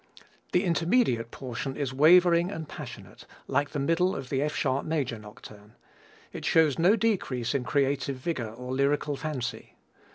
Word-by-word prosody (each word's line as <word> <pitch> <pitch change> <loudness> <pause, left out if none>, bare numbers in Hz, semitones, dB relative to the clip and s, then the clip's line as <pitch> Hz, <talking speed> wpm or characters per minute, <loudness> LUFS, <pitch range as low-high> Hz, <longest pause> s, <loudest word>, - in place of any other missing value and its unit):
The 180 - +2
intermediate 170 - +1
portion 130 +2 -5
is 135 -3 -2
wavering 170 +4 +5
and 160 -6 -6
passionate, - - -10 0.2
like 140 +2 0
the - - -5
middle 165 +6 +1
of 130 -2 -6
the 135 -1 0
F 150 +1 -1
sharp 135 0 0
major 140 -8 -2
Nocturne. 105 0 -14 0.6
It - - -7
shows 160 -3 +3
no 180 +6 +5
decrease 180 - -1
in 140 -3 0
creative 140 +1 0
vigor 130 -4 -3
or 125 +3 -7
lyrical 145 +2 +1
fancy. 135 -5 -5
140 Hz, 155 wpm, -27 LUFS, 125-165 Hz, 0.6 s, wavering